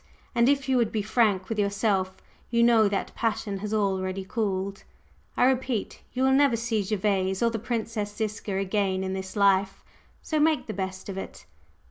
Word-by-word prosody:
And 235 +1 +4
if 280 -1 +1
you 260 -1 +3
would 235 -3 +2
be 215 -2 -1
frank 210 -4 +2
with 225 -2 -3
yourself, 200 -2 0 0.3
you 235 0 +3
know 230 -3 +5
that 195 - -2
passion 215 -3 -2
has 210 +1 -5
already 190 -2 -1
cooled. 195 -2 -2 0.5
I - - +5
repeat, 255 -4 0
you 260 - -1
will 265 - +4
never 275 -2 +4
see 230 -2 0
Gervase 190 -1 0
or 230 - +3
the 225 - -3
Princess 220 -2 -3
Ziska 210 -2 -3
again 195 -1 0
in 190 0 -2
this 190 +1 -5
life; 195 -1 +2 0.4
so 310 - -1
make 310 0 +2
the 215 - -5
best 190 -1 -5
of 195 -1 -4
it." - - -9
210 Hz, 180 wpm, -26 LUFS, 195-235 Hz, 0.5 s, know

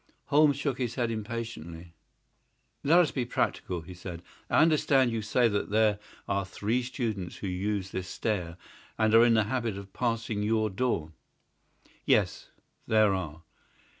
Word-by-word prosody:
Holmes 145 -1 +5
shook 140 -2 -2
his 120 -3 -2
head 120 -3 0
impatiently. 105 -7 -6 0.9
"Let 160 +5 +5
us 175 -4 +4
be 130 - -1
practical," 90 -7 -2
said 90 -1 -8 0.3
he. - - 0
"I - - +7
understand 140 -5 +3
you 115 -1 -2
to 105 - -8
say 120 +2 +3
that 105 -2 -1
there 105 -1 +3 0.3
are 100 0 0
three 105 +6 -1
students 115 -8 -4
who 100 - -5
use 95 +1 -2
this 95 -1 -4
stair 90 -5 -3 0.4
and 110 0 +2
are 115 +1 +8
in 120 -1 +5
the 110 - +4
habit 115 -2 -2
of 100 -1 -10
passing 115 -3 -1
your 110 0 +1
door?" 95 -7 -1 0.9
"Yes, - - +1 0.4
there 110 -2 +4
are." 80 -4 -5
110 Hz, 160 wpm, -29 LUFS, 95-120 Hz, 0.9 s, are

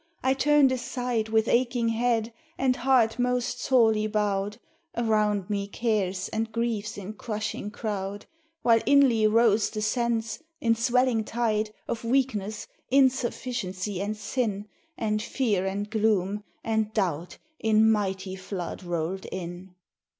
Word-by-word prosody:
I 260 +1 +3
turned 285 0 +4
aside 245 -3 -2
With 220 0 +2
aching 240 -1 +2
head, 230 0 0 0.2
and 260 -1 +2
heart 245 -2 +3
most 250 0 0
sorely 220 -4 +3
bowed; 205 -1 -1 0.4
Around 210 -4 +1
me 200 -1 -2
cares 200 -4 -1
and 225 0 -2
griefs 225 -2 -2
in 200 +1 -6
crushing 215 -1 -4
crowd. 205 -1 -4 0.4
While 230 -1 +5
inly 255 -6 +5
rose 220 -1 +4
the 215 - -4
sense, 225 0 -1 0.2
in 230 -1 +3
swelling 235 0 +2
tide, 220 -1 0 0.2
Of 230 - -3
weakness, 230 -5 0 0.2
insufficiency, 240 -7 0
and 210 +2 -2
sin, 210 -1 -2 0.3
And 215 -1 0
fear, 210 -6 0
and 200 +2 -2
gloom, 210 -2 0 0.2
and 220 -1 0
doubt 175 -5 -1 0.2
in 220 0 +4
mighty 190 -3 -1
flood 185 -2 -5
rolled 175 +1 -3
in. 180 0 -7
220 Hz, 130 wpm, -27 LUFS, 205-235 Hz, 0.4 s, While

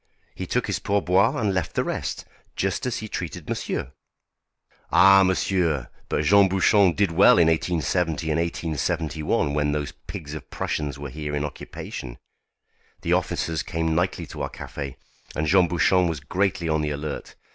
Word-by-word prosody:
He - - -6
took - - 0
his - - -2
pourboire 100 +1 +2
and 105 -4 +1
left 90 -4 -2
the - - +2
rest, - - -3 0.3
just 95 +6 -1
as 125 - -1
he 110 - -5
treated 90 -6 -5
monsieur. 65 - -3 1.0
Ah! 95 +1 +7
monsieur! 90 -7 +1 0.2
but 75 - 0
Jean 100 +5 +5
Bouchon 95 0 +4
did 100 0 +1
well 90 +4 +6
in 85 -2 +5
1870 80 0 0
and 75 - +1
1871 80 -3 -1
when 75 0 +1
those 75 -1 -3
pigs 75 -1 -7
of 75 -3 -8
Prussians 75 -3 -3
were 70 -1 -7
here 75 +1 -4
in 75 0 -1
occupation. 60 -3 -7 0.9
The - - +1
officers 80 -2 0
came 80 0 -1
nightly 90 +3 0
to - - -8
our - - -2
café, 70 -3 -7 0.4
and 75 - 0
Jean 90 +2 +4
Bouchon 90 +1 +3
was 80 -3 -2
greatly 85 +3 -1
on 80 -1 +1
the 75 - -1
alert. 75 0 -5
80 Hz, 165 wpm, -24 LUFS, 75-95 Hz, 1.0 s, Ah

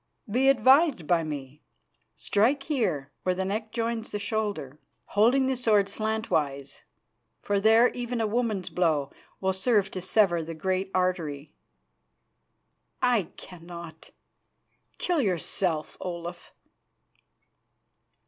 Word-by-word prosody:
Be 255 +6 +3
advised 270 - +4
by 165 +1 +2
me. 145 -1 -7 0.5
Strike 250 +7 +1
here, 180 - -1
where 185 0 0
the 190 +1 -2
neck 215 +3 -3
joins 230 -1 -2
the - - -3
shoulder, 205 - -3 0.3
holding 240 +6 +3
the 265 0 +1
sword 220 -5 +3
slantwise, 165 -11 -2 0.6
for 205 -1 +1
there 225 +4 +5
even 245 -1 -4
a 225 - +1
woman's 215 -4 -1
blow 155 -6 0 0.3
will 190 0 0
serve 200 0 +1
to 185 - -4
sever 180 -3 +2
the 165 +1 -7
great 190 +3 -1
artery." 160 -6 -1 1.5
"I 235 -8 +2
cannot. 170 -2 -11 0.9
Kill 350 -4 0
yourself, 175 - -1
Olaf." 175 -1 -6
195 Hz, 110 wpm, -27 LUFS, 170-225 Hz, 1.5 s, there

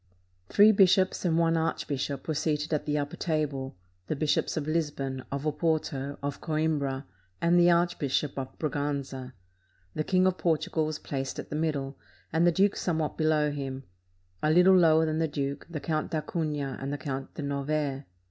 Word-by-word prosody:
Three 210 +2 +7
bishops 190 -2 +4
and 165 -2 +2
one 165 0 +3
archbishop 145 -4 -2
were 160 - 0
seated 150 0 -1
at 150 -1 -1
the 150 0 +1
upper 145 0 -3
table: 145 - -2 0.3
the - - -1
Bishops 150 +2 0
of 150 - -1
Lisbon, 145 -5 -2
of 140 +1 -3
Oporto, 150 -3 -1
of 140 0 -3
Coimbra, 150 -4 -1 0.3
and 170 +1 +4
the 175 0 +6
Archbishop 170 -5 +1
of 130 -1 -7
Braganza. 140 -3 -3 0.6
The 155 - -1
King 185 +2 +2
of 185 -1 +1
Portugal 160 -1 +1
was 155 -1 -3
placed 135 -3 -4
at - - -7
the - - -2
middle, 145 -3 -2 0.3
and 165 +2 +4
the - - +6
duke 195 +4 +3
somewhat 160 -4 -1
below 155 -2 +2
him; 135 -2 -5 0.6
a - - +1
Httle 180 +4 +6
lower 160 -1 +5
than 155 0 -1
the 165 - +2
duke, 140 -2 -4
the 165 -3 -4
Count 155 0 -2
d'Acunha 150 -3 -2
and 135 +1 -3
the 145 - -2
Count 135 -1 -5
de 150 - -5
Novaire. 140 0 -2
150 Hz, 175 wpm, -28 LUFS, 140-160 Hz, 0.6 s, Three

